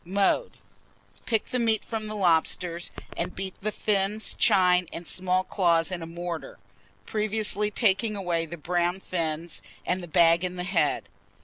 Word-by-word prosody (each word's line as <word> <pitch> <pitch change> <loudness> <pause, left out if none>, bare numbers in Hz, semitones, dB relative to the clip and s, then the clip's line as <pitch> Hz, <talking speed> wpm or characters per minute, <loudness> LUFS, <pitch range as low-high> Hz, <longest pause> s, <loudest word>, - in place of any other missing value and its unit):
Mode. 200 - +1 0.7
Pick 225 -3 +1
the 250 - 0
meat 225 -2 +1
from 220 -2 -4
the 215 - -5
lobsters, 170 -1 +1 0.2
and 180 +2 -3
beat 190 0 -5
the 215 +2 -2
fins, 210 +1 0
chine, 180 -1 +4
and 170 0 -7
small 185 0 +1
claws 170 -3 +2
in 180 -2 -3
a 165 - -6
mortar, 170 0 -6 0.5
previously 210 -1 +1
taking 210 0 +2
away 175 -4 -1
the 170 - -7
brown 175 +3 0
fin 165 -3 -2 0.4
and 185 +1 0
the 175 - -8
bag 170 +1 +4
in 180 0 -2
the 180 - -3
head. 170 -5 +1
180 Hz, 155 wpm, -27 LUFS, 170-210 Hz, 0.7 s, chine